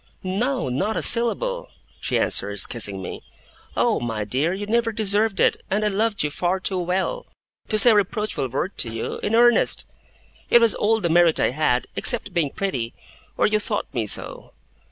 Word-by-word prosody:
'No, 225 - -2
not 190 - -2
a - - -2
syllable!' - - +3 0.3
she - - -2
answers, 100 +1 +1
kissing 100 -5 -3
me. - - -8 0.6
'Oh, - - +1
my 115 -3 -4
dear, 135 +11 -1
you 195 +2 -5
never 230 +2 0
deserved 210 -1 0
it, - - +1
and 210 +2 -1
I - - +2
loved 210 -1 -1
you 150 - -2
far 180 +4 -2
too 190 0 -2
well 185 - -3 0.4
to 215 - 0
say 235 +3 +9
a - - +3
reproachful 210 - -1
word 140 +10 -5
to 115 - +3
you, 115 0 -5
in 210 - -2
earnest 240 0 +3 0.6
it 240 - +6
was 230 -2 +4
all 220 +1 0
the 170 - -1
merit 170 -1 +3
I - - +1
had, 125 -3 0
except 225 -6 +2
being 165 -5 0
pretty 130 -11 -4 0.4
or - - +2
you 215 0 +1
thought 210 0 -3
me 115 -4 -3
so. - - 0
195 Hz, 185 wpm, -22 LUFS, 140-220 Hz, 0.6 s, say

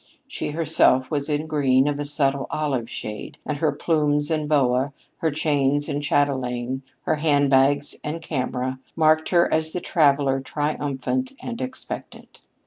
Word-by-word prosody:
She - - -4
herself 150 -4 +2
was 145 0 -1
in 150 +1 0
green 140 -3 +2
of 145 -1 -1
a 145 - -2
subtle 140 -2 0
olive 135 -7 -2
shade, 105 -2 -6
and 150 -2 -3
her 155 - +2
plumes 150 -2 +1
and 155 -2 -1
boa, 135 -1 +2 0.2
her 160 - 0
chains 145 -1 +1
and 145 - -2
chatelaine, 130 -3 0 0.2
her 155 - 0
hand 145 -2 +2
bags 140 +2 +3
and 155 +2 -3
camera, 130 -4 -3 0.2
marked 155 0 +3
her 175 -1 +3
as 160 0 0
the 180 - -1
traveler 140 -5 +2
triumphant 150 - -2
and 235 0 -6
expectant. 255 0 -7
145 Hz, 150 wpm, -23 LUFS, 135-155 Hz, 0.2 s, bags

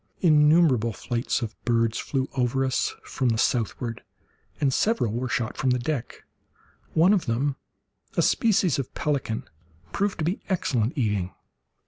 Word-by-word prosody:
Innumerable 150 - +4
flights 120 +3 -2
of 110 -1 -4
birds 115 -1 +1
flew 135 -2 -1
over 130 +1 +1
us 130 - 0
from 130 -2 -1
the 115 - +1
southward, 115 0 -1 0.6
and 135 -2 +2
several 210 - +1
were 125 +2 -2
shot 120 -3 -2
from 130 - +1
the 125 - +3
deck, 125 0 -4 0.7
one 175 +5 +5
of 185 -8 0
them, 130 +5 0 0.6
a - - +4
species 190 - +2
of 135 - -4
pelican, 140 -7 -1 0.5
proved 200 - -1
to 155 - -2
be 180 +5 -1
excellent 135 - 0
eating. 105 -7 0
130 Hz, 145 wpm, -25 LUFS, 115-155 Hz, 0.7 s, one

